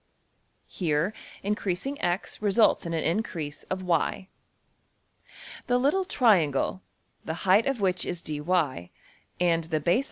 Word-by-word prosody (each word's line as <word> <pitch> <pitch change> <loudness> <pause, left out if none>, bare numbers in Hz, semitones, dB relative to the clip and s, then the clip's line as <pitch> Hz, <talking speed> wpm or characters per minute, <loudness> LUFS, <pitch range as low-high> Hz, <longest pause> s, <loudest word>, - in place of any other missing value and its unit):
Here, 165 +2 -1 0.3
increasing~$x$ 200 0 -2
results 210 -3 +3
in 165 - -3
an 160 - -1
increase 165 -5 -2
of~$y$. 185 0 -1 1.4
The 245 - +3
little 295 +10 +2
triangle, 185 - +2 0.4
the 160 +3 -5
height 195 +6 +5
of 270 -5 -1
which 185 -2 +2
is~$dy$, 155 - -1 0.5
and 165 -2 +2
the 160 -1 -1
base 170 +7 +2
\DPPageSep{023. - - +2
180 Hz, 115 wpm, -27 LUFS, 160-210 Hz, 1.4 s, height